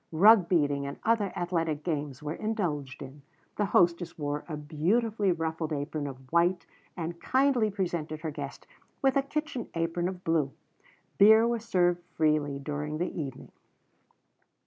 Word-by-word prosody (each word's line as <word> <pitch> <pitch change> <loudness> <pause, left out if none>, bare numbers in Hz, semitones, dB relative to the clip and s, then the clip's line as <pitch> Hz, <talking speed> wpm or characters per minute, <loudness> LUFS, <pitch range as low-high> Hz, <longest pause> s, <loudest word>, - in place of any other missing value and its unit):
Rug 195 +2 +6
beating 145 -5 +1
and 140 - -6
other 220 -4 +2
athletic 165 -4 -1
games 150 -4 -3
were 150 +1 -3
indulged 160 - -3
in. 140 +2 -11 0.4
The 210 - +2
hostess 170 -2 +2
wore 145 -1 -3
a 155 - -3
beautifully 195 +8 +1
ruffled 160 -1 -2
apron 145 0 -3
of 130 -1 -10
white 175 +2 +3 0.3
and 170 0 -5
kindly 260 -4 +2
presented 170 -6 -3
her 160 -1 -3
guest 145 -2 -7 0.4
with 270 -1 +3
a 275 - +4
kitchen 285 -3 -4
apron 165 +1 0
of 185 -1 -6
blue. 155 -4 +1 0.7
Beer 220 +3 +7
was 235 -2 -1
served 175 -5 +2
freely 150 -3 +1
during 150 +2 -4
the 175 +3 -2
evening.'" 140 -6 -6
165 Hz, 145 wpm, -29 LUFS, 150-195 Hz, 0.7 s, Beer